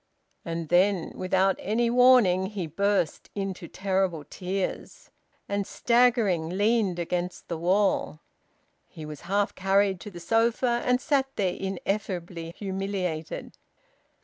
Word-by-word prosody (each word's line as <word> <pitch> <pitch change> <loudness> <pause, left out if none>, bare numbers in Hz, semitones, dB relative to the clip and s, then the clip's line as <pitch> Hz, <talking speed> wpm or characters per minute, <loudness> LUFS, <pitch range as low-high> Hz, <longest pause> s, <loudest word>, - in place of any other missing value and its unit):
And 165 -1 -4
then, 180 0 +3
without 190 +1 +1
any 230 +4 0
warning, 240 -7 +5
he 195 -3 -4
burst 195 +1 0
into 195 -3 -4
terrible 190 -5 -1
tears, 185 +1 -4 0.4
and, 200 -1 -2
staggering, 235 -9 +2
leaned 205 0 +1
against 175 +1 -3
the 170 - -2
wall. 185 -3 +1 0.7
He 155 - -10
was 150 -1 -8
half 200 +1 +1
carried 195 0 +2
to 210 - -8
the 175 -3 -10
sofa, 235 +5 +1
and 250 0 +3
sat 270 -1 +1
there, 185 -3 0
ineffably 185 -3 -4
humiliated. 190 -5 -4
195 Hz, 120 wpm, -27 LUFS, 175-210 Hz, 0.7 s, warning